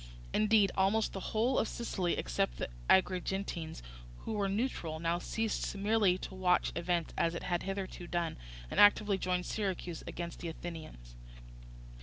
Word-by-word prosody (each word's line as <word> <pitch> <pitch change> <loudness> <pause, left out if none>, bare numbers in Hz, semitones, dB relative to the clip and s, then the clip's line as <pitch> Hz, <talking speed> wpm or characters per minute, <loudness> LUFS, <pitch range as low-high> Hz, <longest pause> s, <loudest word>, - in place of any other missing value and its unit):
Indeed 215 -2 +4
almost 195 +3 +2
the 195 - -3
whole 235 +4 +2
of - - +1
Sicily, 190 -7 -1
except - - -1
the - - -3 0.2
Agrigentines, 185 - +1 0.4
who - - -4
were 200 -2 0
neutral, 195 -7 -2
now 170 +1 0
ceased 225 +1 -2
merely 200 -2 +3
to 190 - -7
watch 185 -1 +2
events 170 -1 -1
as 165 0 +1
it - - -4
had 175 -1 0
hitherto 195 -2 -4
done, 170 -1 -1 0.4
and - - 0
actively 205 -1 +6
joined 180 -1 0
Syracuse 185 -5 -3
against 170 0 -5
the 170 - -5
Athenians. 160 - -8
185 Hz, 150 wpm, -33 LUFS, 170-205 Hz, 0.4 s, actively